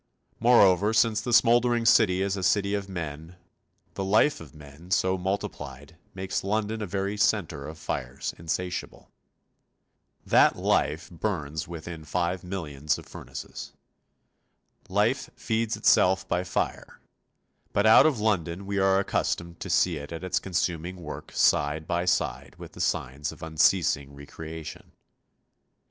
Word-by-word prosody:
Moreover, 105 -4 +5
since 110 -2 +3
the 120 +2 -4
smouldering 120 0 +4
city 95 -4 +4
is 100 0 -1
a 95 - -4
city 100 +2 +2
of 100 -1 -3
men, 80 -1 -6 0.6
the 95 - -3
life 110 - +3
of 80 -1 -13
men, 75 +3 -14
so 95 -2 +2
multiplied, 95 +2 -5 0.2
makes 95 0 -3
London 110 +2 -1
a 105 - -3
very 100 +2 -2
centre 85 -9 0
of 80 +1 -9
fires 65 -4 -4
insatiable. 90 +2 -4 1.1
That - - +5
life 80 +4 0
burns 80 -4 -3
within 85 -1 -8
five 90 +2 -2
millions 75 -5 -3
of - - -11
furnaces. - - -9 1.2
Life 105 +7 +1
feeds 115 -1 -1
itself 95 +1 +3
by 90 0 -1
fire, - - -3 0.7
but 100 - +1
out 110 +7 +8
of 140 -8 0
London 95 -3 -1
we 100 0 -2
are 95 0 +4
accustomed 85 -3 -2
to - - -6
see 85 -3 +2
it 70 +1 -8
at 80 +1 -6
its 95 - 0
consuming 90 -1 -2
work 85 -5 -8
side 75 +1 +2
by 85 +2 -1
side 65 -7 -1
with - - -10
the - - -8
signs 70 +4 -2
of 80 +1 -12
unceasing 80 -3 +2
re 70 0 -11
creation. 80 +1 -9
90 Hz, 140 wpm, -27 LUFS, 80-100 Hz, 1.2 s, out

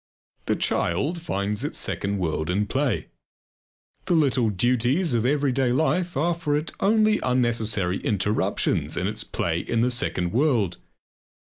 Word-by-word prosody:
The - - +2
child 145 - -1
finds 105 - -2
its 145 - -3
second 100 +1 -1
world 80 -3 -2
in 100 +4 +1
play. 130 +1 -1 1.0
The 175 - +2
little 130 -7 +2
duties 125 - +1
of 120 0 +1
everyday 135 -3 +1
life 170 +5 0
are 170 +5 +2
for 160 -3 -1
it 155 +2 -3
only 215 +1 +3
unnecessary 115 -7 0
interruptions 105 0 0
in 90 - -1
its 105 +1 -3
play 85 -1 -2
in 115 +5 -1
the 125 +1 +2
second 90 -5 -1
world. 120 - +1
120 Hz, 140 wpm, -24 LUFS, 100-150 Hz, 1.0 s, only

